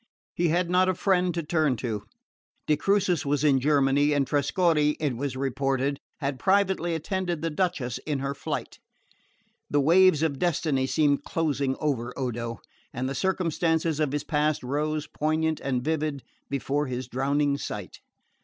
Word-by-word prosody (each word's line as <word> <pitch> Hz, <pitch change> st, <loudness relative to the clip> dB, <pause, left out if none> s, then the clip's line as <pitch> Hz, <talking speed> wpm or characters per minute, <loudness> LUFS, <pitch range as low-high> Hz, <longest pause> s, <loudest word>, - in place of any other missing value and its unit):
He 175 Hz, -, +1 dB
had 175 Hz, +2 st, +1 dB
not 180 Hz, +1 st, +3 dB
a 185 Hz, -, +1 dB
friend 180 Hz, -1 st, +2 dB
to 170 Hz, -, -2 dB
turn 155 Hz, -4 st, +1 dB
to. 110 Hz, -4 st, -4 dB, 0.6 s
De 150 Hz, -, +3 dB
Crucis 185 Hz, 0 st, +1 dB
was 145 Hz, 0 st, 0 dB
in 140 Hz, -3 st, +4 dB
Germany, 145 Hz, +1 st, +3 dB
and 140 Hz, -1 st, +2 dB
Trescorre, 150 Hz, +2 st, +2 dB
it 145 Hz, -5 st, -1 dB
was 130 Hz, +1 st, -3 dB
reported, 135 Hz, +1 st, -1 dB, 0.2 s
had 140 Hz, -2 st, -2 dB
privately 190 Hz, -1 st, +2 dB
attended 175 Hz, 0 st, -2 dB
the 165 Hz, -, -1 dB
Duchess 150 Hz, -8 st, -1 dB
in 150 Hz, -2 st, -3 dB
her 140 Hz, +1 st, -2 dB
flight. -, -, -5 dB, 0.9 s
The 145 Hz, -, +2 dB
waves 165 Hz, +2 st, +5 dB
of 140 Hz, -4 st, 0 dB
destiny 155 Hz, -6 st, +1 dB
seemed 145 Hz, +1 st, +2 dB
closing 145 Hz, -4 st, -1 dB
over 125 Hz, -5 st, -2 dB
Odo, 120 Hz, -3 st, -3 dB, 0.3 s
and 125 Hz, +2 st, -3 dB
the 135 Hz, -, -2 dB
circumstances 165 Hz, -1 st, 0 dB
of 150 Hz, -3 st, +1 dB
his 145 Hz, 0 st, -2 dB
past 150 Hz, -1 st, 0 dB
rose, 150 Hz, +3 st, -1 dB
poignant 155 Hz, +1 st, -1 dB
and 130 Hz, -2 st, -2 dB
vivid, 155 Hz, -2 st, -1 dB, 0.3 s
before 140 Hz, +1 st, -1 dB
his 130 Hz, 0 st, -4 dB
drowning 140 Hz, +2 st, 0 dB
sight. 105 Hz, -8 st, -6 dB
150 Hz, 155 wpm, -26 LUFS, 135-165 Hz, 0.9 s, waves